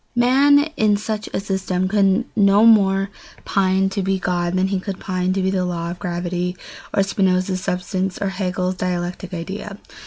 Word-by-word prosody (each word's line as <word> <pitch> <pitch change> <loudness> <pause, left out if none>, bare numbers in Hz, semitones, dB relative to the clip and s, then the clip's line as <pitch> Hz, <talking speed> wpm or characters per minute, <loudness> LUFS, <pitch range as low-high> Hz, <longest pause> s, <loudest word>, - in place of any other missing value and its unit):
Man 275 +4 +5
in 210 -1 +3
such 215 0 -4
a - - -1
system 190 -2 -1
could 200 +3 +2
no 205 +1 +5
more 195 -3 +4 0.3
pine 190 0 +2
to 195 +1 -2
be 190 0 0
God 175 -1 -1
than 185 +1 +1
he 195 -1 0
could 190 0 -6
pine 185 -1 -1
to 190 0 -1
be 190 - +1
the 185 -1 0
law 170 -1 -3
of 175 - -8
gravity, 180 +1 -3 0.3
or 195 - +2
Spinoza's 185 -1 0
substance, 185 +1 -2
or 200 - -1
Hegel's 185 -1 -2
dialectical 180 0 -3
idea. 195 +4 -6
190 Hz, 175 wpm, -20 LUFS, 180-200 Hz, 0.3 s, Man